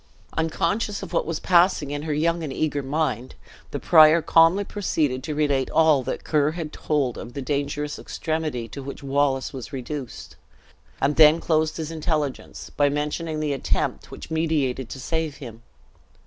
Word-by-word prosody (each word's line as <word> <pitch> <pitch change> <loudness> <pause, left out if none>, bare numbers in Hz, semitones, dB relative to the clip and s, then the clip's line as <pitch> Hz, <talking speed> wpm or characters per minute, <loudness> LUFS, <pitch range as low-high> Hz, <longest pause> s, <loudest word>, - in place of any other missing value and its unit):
Unconscious 195 +6 -1
of - - -8
what - - 0
was 165 -2 -2
passing 175 -5 +3
in 145 0 -3
her 155 0 -2
young 165 +3 +1
and 155 -4 -4
eager 145 0 -1
mind, 135 -3 -2 0.3
the - - -4
prior 155 0 +7
calmly 165 +4 +4
proceeded 155 -11 -1
to 150 +2 -4
relate 145 -3 +1
all 160 -4 +4
that - - -4
Ker 150 -1 +1
had 160 -3 -6
told 140 -6 -1
of 120 - -9
the 140 - -3
dangerous 145 +2 -2
extremity 155 -7 -3
to 140 - -7
which 140 +1 -8
Wallace 135 -1 0
was 130 -3 -7
reduced; 135 0 -7 0.6
and 140 +2 +1
then 155 +1 +7
closed 155 -2 0
his 160 -1 -4
intelligence, 155 -3 -3
by 145 -1 +2
mentioning 150 +2 -2
the 150 -2 0
attempt 135 - -2
which - - -10
meditated 145 -6 0
to 135 - -7
save 160 +2 -2
him. 115 -6 -10
150 Hz, 165 wpm, -24 LUFS, 140-160 Hz, 0.6 s, prior